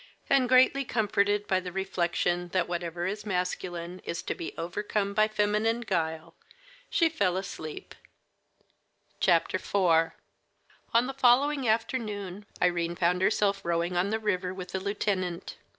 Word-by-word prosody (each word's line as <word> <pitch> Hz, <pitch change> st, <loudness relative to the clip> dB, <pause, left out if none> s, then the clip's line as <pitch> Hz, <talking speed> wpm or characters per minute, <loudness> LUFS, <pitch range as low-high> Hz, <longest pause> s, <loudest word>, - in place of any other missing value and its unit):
And 265 Hz, -3 st, +4 dB
greatly 260 Hz, +2 st, +5 dB
comforted 205 Hz, -3 st, +1 dB
by 190 Hz, -3 st, +2 dB
the 180 Hz, -1 st, -6 dB
reflection 175 Hz, -2 st, -1 dB
that 185 Hz, -2 st, +1 dB
whatever 175 Hz, 0 st, -3 dB
is 205 Hz, +3 st, -3 dB
masculine 180 Hz, -2 st, -3 dB
is 170 Hz, -, -5 dB
to -, -, -2 dB
be 165 Hz, -, -6 dB
overcome 200 Hz, +4 st, -2 dB
by 215 Hz, +1 st, +4 dB
feminine 215 Hz, +2 st, +1 dB
guile, 160 Hz, -7 st, -2 dB, 0.6 s
she 335 Hz, -, +3 dB
fell 200 Hz, -, 0 dB
asleep. 190 Hz, -5 st, -6 dB, 1.3 s
IV 175 Hz, +2 st, +3 dB, 1.3 s
On 235 Hz, +2 st, +4 dB
the 270 Hz, -, -4 dB
following 270 Hz, +1 st, +3 dB
afternoon 210 Hz, -4 st, -2 dB
Irene 175 Hz, -1 st, +1 dB
found 180 Hz, +1 st, +1 dB
herself 200 Hz, 0 st, +2 dB
rowing 170 Hz, +1 st, 0 dB
on 180 Hz, +3 st, +1 dB
the 220 Hz, -, 0 dB
river 185 Hz, -4 st, -1 dB
with 180 Hz, -1 st, -7 dB
the 190 Hz, -, -2 dB
lieutenant. 190 Hz, -3 st, -2 dB
195 Hz, 135 wpm, -28 LUFS, 175-215 Hz, 1.3 s, greatly